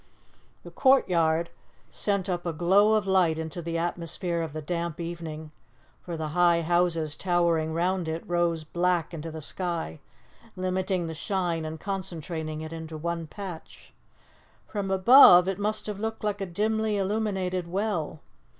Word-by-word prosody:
The -, -, -10 dB
courtyard 170 Hz, -, +3 dB, 0.4 s
sent 200 Hz, -2 st, -1 dB
up 175 Hz, -2 st, -2 dB
a 170 Hz, -, -1 dB
glow 195 Hz, +7 st, +4 dB
of 215 Hz, -3 st, +1 dB
light 185 Hz, -4 st, +3 dB
into 160 Hz, +2 st, -5 dB
the 165 Hz, 0 st, -3 dB
atmosphere 170 Hz, 0 st, -2 dB
of 165 Hz, -3 st, -4 dB
the 155 Hz, -, -5 dB
damp 170 Hz, 0 st, -3 dB
evening, 165 Hz, -2 st, -6 dB, 0.5 s
for 170 Hz, -2 st, -6 dB
the 155 Hz, -1 st, -3 dB
high 170 Hz, +1 st, +3 dB
houses 165 Hz, -2 st, +1 dB
towering 170 Hz, -3 st, +1 dB
round 175 Hz, +1 st, 0 dB
it 160 Hz, +1 st, -3 dB
rose 175 Hz, -2 st, 0 dB
black 175 Hz, +1 st, 0 dB
into 165 Hz, 0 st, -5 dB
the 160 Hz, 0 st, -7 dB
sky, 170 Hz, -2 st, -3 dB, 0.6 s
limiting 185 Hz, -1 st, -1 dB
the 160 Hz, -, -4 dB
shine 170 Hz, 0 st, -2 dB
and 155 Hz, 0 st, -6 dB
concentrating 165 Hz, -5 st, -4 dB
it 160 Hz, +1 st, -7 dB
into 160 Hz, -1 st, -7 dB
one 170 Hz, +1 st, -3 dB
patch. 185 Hz, -1 st, -9 dB, 0.7 s
From 200 Hz, -2 st, -4 dB
above, 190 Hz, -2 st, +8 dB
it 195 Hz, 0 st, -2 dB
must 215 Hz, +1 st, -1 dB
have 210 Hz, -2 st, -5 dB
looked 220 Hz, +1 st, -4 dB
like 205 Hz, -1 st, -1 dB
a 195 Hz, -, -2 dB
dimly 215 Hz, +3 st, 0 dB
illuminated 190 Hz, -3 st, -1 dB
well. 180 Hz, -5 st, -2 dB
175 Hz, 150 wpm, -27 LUFS, 160-190 Hz, 0.7 s, above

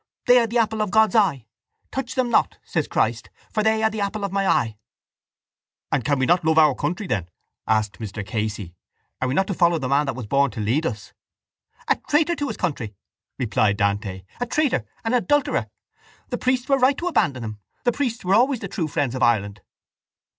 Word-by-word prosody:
They 245 Hz, 0 st, +7 dB
are 230 Hz, -, +1 dB
the 235 Hz, +2 st, -1 dB
apple 220 Hz, -1 st, +1 dB
of 210 Hz, -, 0 dB
God's 220 Hz, +2 st, +4 dB
eye. 170 Hz, -, +2 dB, 0.5 s
Touch 265 Hz, -2 st, -4 dB
them 250 Hz, -2 st, 0 dB
not, -, -, +2 dB
says -, -, -2 dB
Christ, -, -, -1 dB, 0.2 s
for 215 Hz, -, 0 dB
they 220 Hz, +1 st, +2 dB
are 220 Hz, -, +4 dB
the 215 Hz, -1 st, -4 dB
apple 200 Hz, +1 st, -2 dB
of 200 Hz, -, -2 dB
My 195 Hz, 0 st, 0 dB
eye. 110 Hz, -, +1 dB, 1.1 s
—And 135 Hz, -, +1 dB
can 145 Hz, -1 st, +1 dB
we 130 Hz, -, +1 dB
not 175 Hz, +6 st, +3 dB
love 160 Hz, 0 st, +2 dB
our 155 Hz, -3 st, +6 dB
country 175 Hz, -, -3 dB
then? 90 Hz, -, -2 dB, 0.4 s
asked 110 Hz, -2 st, 0 dB
Mr 105 Hz, -2 st, -5 dB
Casey. 105 Hz, -3 st, -3 dB, 0.5 s
Are 130 Hz, -, +1 dB
we 130 Hz, -, -1 dB
not 190 Hz, -, +3 dB
to 195 Hz, -, -3 dB
follow 170 Hz, -1 st, +3 dB
the 135 Hz, -5 st, -3 dB
man 140 Hz, +2 st, +2 dB
that 135 Hz, -, -2 dB
was 125 Hz, -3 st, -6 dB
born 140 Hz, +5 st, +2 dB
to 120 Hz, -, -8 dB
lead 125 Hz, +10 st, +1 dB
us? 105 Hz, -7 st, -7 dB, 0.7 s
—A -, -, +3 dB
traitor 320 Hz, +3 st, +3 dB
to 290 Hz, -, -2 dB
his -, -, -5 dB
country! 125 Hz, -, -3 dB, 0.4 s
replied 105 Hz, -3 st, +1 dB
Dante. 100 Hz, -2 st, -1 dB, 0.2 s
A 245 Hz, -, -2 dB
traitor, 250 Hz, -, 0 dB, 0.2 s
an 225 Hz, -, 0 dB
adulterer! 290 Hz, +4 st, +1 dB, 0.6 s
The -, -, -3 dB
priests 255 Hz, 0 st, 0 dB
were 275 Hz, -1 st, +3 dB
right 265 Hz, +2 st, +4 dB
to 350 Hz, -, -3 dB
abandon 150 Hz, -, +1 dB
him. 110 Hz, -1 st, -6 dB, 0.2 s
The 245 Hz, -, +3 dB
priests 240 Hz, -5 st, -3 dB
were 185 Hz, -, +2 dB
always 250 Hz, +4 st, +3 dB
the 195 Hz, -, -4 dB
true 180 Hz, -4 st, -2 dB
friends 145 Hz, -5 st, -1 dB
of 130 Hz, -, -4 dB
Ireland. 105 Hz, -4 st, +1 dB
160 Hz, 210 wpm, -23 LUFS, -, 1.1 s, They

